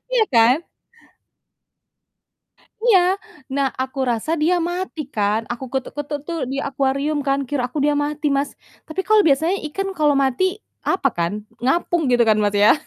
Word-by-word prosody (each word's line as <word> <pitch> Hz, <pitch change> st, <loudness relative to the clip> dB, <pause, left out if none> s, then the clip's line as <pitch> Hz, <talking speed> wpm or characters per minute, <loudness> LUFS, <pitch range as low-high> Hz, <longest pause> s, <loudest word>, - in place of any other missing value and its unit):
Iya 480 Hz, -3 st, +4 dB
kan? 235 Hz, +6 st, +5 dB, 2.2 s
Iya. 410 Hz, -7 st, +6 dB, 0.5 s
Nah, 275 Hz, -1 st, +2 dB
aku 260 Hz, +1 st, -6 dB
rasa 235 Hz, +6 st, -2 dB
dia 340 Hz, +4 st, +3 dB
mati 350 Hz, 0 st, -3 dB
kan, 210 Hz, +1 st, +1 dB
aku 245 Hz, +2 st, -6 dB
ketuk-ketuk 290 Hz, +2 st, -3 dB
tuh 335 Hz, -1 st, -3 dB
di -, -, -2 dB
akuarium 275 Hz, +2 st, 0 dB
kan, 275 Hz, 0 st, +2 dB
kira 280 Hz, -2 st, -1 dB
aku 295 Hz, -, -5 dB
dia 295 Hz, -, +3 dB
mati, 300 Hz, +1 st, -3 dB
Mas, 280 Hz, +1 st, 0 dB, 0.4 s
tapi 315 Hz, +4 st, -3 dB
kalau 430 Hz, 0 st, +5 dB
biasanya 320 Hz, +7 st, +2 dB
ikan 390 Hz, +6 st, -3 dB
kalau 295 Hz, -2 st, +3 dB
mati, 265 Hz, +7 st, +1 dB, 0.4 s
apa 365 Hz, -7 st, +1 dB
kan, 170 Hz, +1 st, 0 dB, 0.3 s
ngapung 335 Hz, +6 st, +1 dB
gitu 245 Hz, -1 st, +4 dB
kan, 215 Hz, -, +5 dB
Mas, 205 Hz, -1 st, +1 dB
ya? 205 Hz, +1 st, +6 dB
285 Hz, 155 wpm, -21 LUFS, 250-330 Hz, 2.2 s, Iya